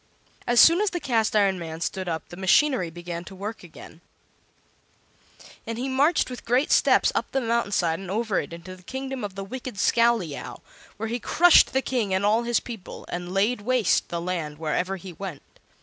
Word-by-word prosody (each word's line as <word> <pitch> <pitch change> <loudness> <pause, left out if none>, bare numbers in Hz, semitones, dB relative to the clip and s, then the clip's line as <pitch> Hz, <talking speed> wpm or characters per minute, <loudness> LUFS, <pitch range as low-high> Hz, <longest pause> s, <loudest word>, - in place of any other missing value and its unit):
As 240 0 +4
soon 335 +4 +7
as 420 - +2
the 350 - -3
Cast 225 -7 0
iron 195 -3 +3
Man 160 -1 -6
stood 185 +1 -3
up 160 -2 -4
the - - -9
machinery 190 - +2
began 175 0 -7
to 190 - -11
work 210 +4 -6
again, 170 -1 -13 1.7
and 230 0 -4
he 255 +3 -3
marched 280 +5 +2
with 250 -2 -8
great 250 +5 +1
steps - - +4
up - - -2
the 270 - +1
mountain 235 -3 0
side 170 -4 +1
and 195 -2 -8
over 215 0 0
into 170 +2 -8
the 185 - -18
kingdom 265 +4 -5
of 200 -2 -5
the 195 - -5
wicked 255 +3 -7
Scowleyow, 230 -9 +1 0.4
where 225 +1 -4
he 240 +2 -2
crushed 345 +8 +5
the 265 0 0
King 225 -7 -1
and 190 +2 0
all 215 +3 +3
his 240 0 +1
people, 225 -6 -9
and 175 0 -5
laid 205 +5 +1
waste 245 -2 +1
the 170 - -3
land 170 -4 -4
wherever 165 +5 -1
he 185 -1 -10
went. 180 -5 -7
205 Hz, 195 wpm, -25 LUFS, 180-245 Hz, 1.7 s, soon